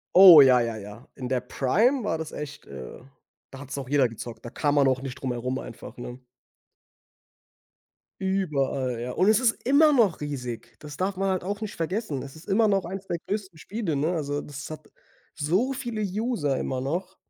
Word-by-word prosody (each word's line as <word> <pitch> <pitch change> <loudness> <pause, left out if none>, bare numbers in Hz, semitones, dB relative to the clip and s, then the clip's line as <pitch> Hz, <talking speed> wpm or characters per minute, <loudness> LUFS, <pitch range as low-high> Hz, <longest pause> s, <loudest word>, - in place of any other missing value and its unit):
Oh, 180 -5 +11
ja, 130 -2 +6
ja, 115 -2 -2
ja. 105 +4 -10
In 125 -2 -5
der 125 -1 0
Prime 215 - +1
war 165 -6 -1
das 160 - -5
echt, 145 -1 -8
äh, 65 -2 -9 0.5
da 135 - -11
hat's 140 -1 -7
noch 135 -2 -6
jeder 140 -3 +4
gezockt. 115 0 -9
Da 120 - -7
kam 145 0 0
man 140 -2 +5
auch 130 0 +1
nicht 135 -2 -6
drum 130 -2 -3
herum 125 +2 -2
einfach, 120 -2 -9
ne? 120 +1 -8 2.0
Überall, 140 -10 -1
ja. 125 - -4
Und 185 +9 +2
es 215 0 +5
ist 240 -3 +3
immer 295 +4 +6
noch 225 - +3
riesig. 125 -6 -5
Das 150 -2 -9
darf 190 0 -1
man 195 0 0
halt 185 -2 -1
auch 200 +3 -4
nicht 215 -1 -5
vergessen. 165 - -2
Es 140 +2 -9
ist 160 - -14
immer 215 +3 +3
noch 195 -3 +1
1 195 +2 -6
der 170 - -1
größten 195 -5 -4
Spiele, 195 -1 -3
ne? 155 +6 0
Also, 145 -3 -2
das 145 +1 -8
hat 155 - -9 0.5
so 190 - 0
viele 240 -4 -4
User 200 - -1
immer 130 - -2
noch. 180 +8 -3
150 Hz, 200 wpm, -26 LUFS, 130-195 Hz, 2.0 s, Oh